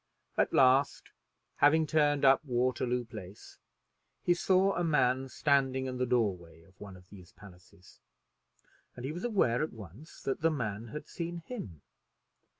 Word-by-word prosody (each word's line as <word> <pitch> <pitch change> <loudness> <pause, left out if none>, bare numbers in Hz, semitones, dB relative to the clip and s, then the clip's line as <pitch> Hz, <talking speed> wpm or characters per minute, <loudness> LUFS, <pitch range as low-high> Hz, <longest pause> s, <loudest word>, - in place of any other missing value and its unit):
At - - +1
last, 135 +2 +3 0.5
having 155 +3 +4
turned 145 -2 +2
up 135 +2 +5
Waterloo 125 -1 -1
Place, 95 -3 -11 0.6
he 175 - +3
saw 190 +2 +2
a 175 - -1
man 135 -5 +1
standing 135 -2 +1
in 130 -1 -5
the 125 - 0
door 115 -6 +2
way 85 -1 -17
of 95 - -23
one 100 -2 -10
of 90 0 -19
these 95 -3 -14
palaces, 90 -1 -17 1.0
and 120 - -7
he 140 - -3
was 175 +3 -7
aware 190 - +1
at 155 - -3
once 110 - -13
that 135 - -2
the 165 - +3
man 115 -7 -4
had 150 +7 -8
seen 170 0 -6
him. 95 - -8
130 Hz, 155 wpm, -30 LUFS, 105-155 Hz, 1.0 s, up